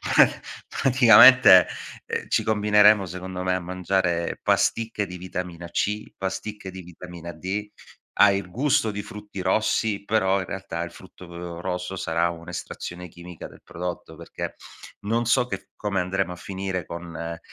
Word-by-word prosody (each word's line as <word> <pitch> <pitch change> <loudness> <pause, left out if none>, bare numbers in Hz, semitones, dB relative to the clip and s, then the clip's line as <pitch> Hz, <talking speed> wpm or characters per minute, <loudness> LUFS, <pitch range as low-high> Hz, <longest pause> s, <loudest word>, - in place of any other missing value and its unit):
pra - - +8 0.6
praticamente, 125 -5 +8 0.4
ehm, - - -4
ci - - +2
combineremo 105 -1 +4
secondo 90 +1 -6
me 90 0 +1
a - - -1
mangiare 90 -1 -1
pasticche 110 -3 +1
di 90 0 -8
vitamina 90 -1 -6
C, 105 +4 -2
pasticche 95 +1 -5
di 95 0 -8
vitamina 85 0 -9
D, 95 +6 -4 0.5
ha 105 -1 +8
il 100 -2 -2
gusto 120 +1 +1
di 105 0 -4
frutti 105 -1 -9
rossi, 105 +2 0
però 100 -2 +1
in 95 - -4
realtà 90 -3 -5
il 85 - -7
frutto, 90 +1 -14
uhm, 85 0 -8
rosso 90 +1 -4
sarà 85 -1 0
un'estrazione 85 +1 -7
chimica 85 0 -10
del - - -17
prodotto, 90 0 -6
perché - - -7 0.5
non 115 +3 0
so 120 +2 +3
che - - -6
come 100 -2 -2
andremo 90 0 -2
a - - -9
finire 95 -1 -4
con, 85 -1 -8
ehm, 85 0 -5
95 Hz, 155 wpm, -24 LUFS, 90-105 Hz, 0.6 s, pra